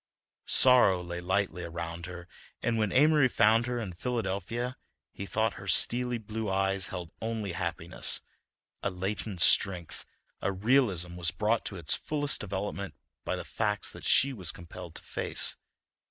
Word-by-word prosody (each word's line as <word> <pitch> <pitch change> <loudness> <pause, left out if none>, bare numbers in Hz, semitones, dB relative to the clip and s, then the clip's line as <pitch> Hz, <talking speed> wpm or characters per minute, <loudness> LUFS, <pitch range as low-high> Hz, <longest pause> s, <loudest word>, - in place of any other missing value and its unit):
Sorrow 120 -8 +5
lay 85 0 -6
lightly 95 0 -1
around 85 0 -6
her, 90 -1 -9 0.4
and 115 -1 0
when 105 -2 0
Amory 150 0 +5
found 115 0 +3
her 125 0 -2
in 105 -6 -4
Philadelphia 115 +3 -3 0.4
he 100 - -7
thought 110 +2 0
her 95 - -10
steely 125 +4 +3
blue 110 -1 -5
eyes 95 -1 +1
held 90 -3 -7
only 110 -3 -3
happiness; 85 -1 -1 0.6
a - - -1
latent 95 0 -4
strength, 90 -2 +4 0.4
a 100 - 0
realism, 95 -5 +1
was 85 -1 +2
brought 105 +5 0
to 100 - -5
its 85 -4 +1
fullest 145 -2 -1
development 100 0 -4 0.3
by - - -2
the - - -6
facts - - -2
that - - -7
she 140 +1 +5
was 90 -9 -3
compelled 85 0 -11
to - - -10
face. - - +2
100 Hz, 155 wpm, -29 LUFS, 90-115 Hz, 0.6 s, Sorrow